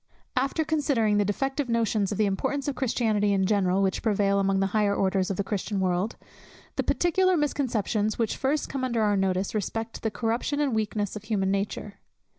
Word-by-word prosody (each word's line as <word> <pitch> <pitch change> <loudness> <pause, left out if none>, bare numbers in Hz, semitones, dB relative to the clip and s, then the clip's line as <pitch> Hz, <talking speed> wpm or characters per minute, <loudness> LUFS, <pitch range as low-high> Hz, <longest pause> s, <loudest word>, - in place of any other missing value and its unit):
_ - - -53 0.3
After 275 +5 +1
considering 280 -9 +1
the 205 - +3
defective 270 +6 -1
notions 220 -3 +1
of 205 - -2
the 215 - +3
importance 265 +8 -1
of 285 - 0
Christianity 220 -5 +1
in 190 -1 +2
general, 195 -1 +2
which 190 -1 0
prevail 200 -3 +2
among 195 0 +2
the 195 - +2
higher 210 -2 +2
orders 190 -1 +1
of 195 - -2
the 200 - 0
Christian 200 0 -2
world, 185 +3 0 0.6
the - - +1
particular 370 +1 +2
misconceptions 230 -7 0
which 230 -2 0
first 280 +3 0
come 270 -1 -4
under 235 -3 +1
our 205 -1 +3
notice 190 0 0
respect 225 +2 -3
the 220 - 0
corruption 230 +6 -1
and 285 -4 +1
weakness 210 -2 -1
of 210 0 -7
human 195 -3 0
nature. 200 +1 -3
215 Hz, 195 wpm, -26 LUFS, 200-255 Hz, 0.6 s, the